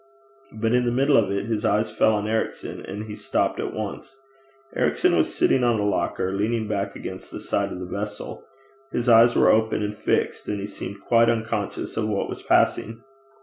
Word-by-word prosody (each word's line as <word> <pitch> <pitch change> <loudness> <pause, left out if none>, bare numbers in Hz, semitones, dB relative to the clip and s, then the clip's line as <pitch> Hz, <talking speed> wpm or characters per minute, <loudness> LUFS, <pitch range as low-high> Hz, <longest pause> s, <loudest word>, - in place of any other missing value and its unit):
But 110 +1 -1
in 125 0 +3
the 120 - +1
middle 135 +3 +3
of 110 -5 +3
it 100 0 -2
his 110 -2 -2
eyes 105 +2 +1
fell 110 - +4
on 105 0 -2
Ericson, 110 0 -3
and 105 +2 -5
he 105 -1 -7
stopped - - -1
at - - -2
once. 110 +5 -6 0.6
Ericson - - +2
was - - +1
sitting 130 - +3
on 120 -3 +2
a 105 - 0
locker, 95 -2 -1
leaning 110 +2 -1
back 100 -2 -2
against - - -7
the - - -7
side - - -1
of - - -5
the 90 - -5
vessel: 105 +3 -6 0.5
his 120 +1 -2
eyes 120 0 +6
were - - +5
open 110 -1 +2
and 105 0 -2
fixed, 105 - -1
and 105 - -2
he 100 - -4
seemed 100 -1 -7
quite 115 +1 +4
unconscious 110 -1 -2
of 110 - 0
what 105 -2 -1
was - - -6
passing. 115 +2 +1
110 Hz, 200 wpm, -24 LUFS, 105-115 Hz, 0.6 s, eyes